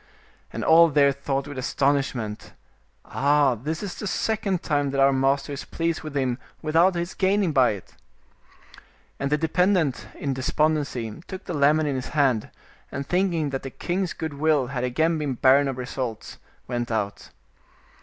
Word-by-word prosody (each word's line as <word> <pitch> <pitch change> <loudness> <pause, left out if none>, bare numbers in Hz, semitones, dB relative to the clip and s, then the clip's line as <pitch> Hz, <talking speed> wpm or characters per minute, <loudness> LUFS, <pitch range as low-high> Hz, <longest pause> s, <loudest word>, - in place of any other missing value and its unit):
And - - -4
all 165 +1 +7
there 140 -1 +4
thought 140 0 -3
with 145 -2 -6
astonish 140 +1 +1
ment 105 -3 -6 0.3
— - - -39 0.2
"Ah! 140 -1 +2
this 150 - -4
is 200 - -4
the 210 - -6
second 200 -2 -1
time 145 -2 0
that 135 0 -2
our 135 0 +5
master 135 +1 +1
is 140 - -5
pleased 165 -1 -2
with 155 -2 -5
him 130 -2 0 0.2
without 165 +4 +3
his 170 +1 -3
gaining 195 -2 +1
by 130 -6 +4
it." 100 - -11 1.3
And 140 +1 -2
the 150 - +3
de 160 - -1
pendent, 180 -4 +1
in 140 -2 -2
despondency, 140 -3 -1
took 190 -1 -7
the - - -4
lemon 150 +1 +3
in 145 - 0
his 130 -1 -4
hand, 130 -7 +2 0.4
and 140 +1 -4
thinking 175 -4 0
that 135 - -3
the 135 - -6
king's 180 +6 -2
good 160 -2 -5
will 150 -1 +2
had 125 -1 -2
again 160 +6 +1
been 145 -4 -2
barren 135 +3 +4
of 135 -2 -3
results, 125 -2 -5 0.3
went 120 -1 -3
out. 105 -3 -3
145 Hz, 175 wpm, -24 LUFS, 130-160 Hz, 1.3 s, all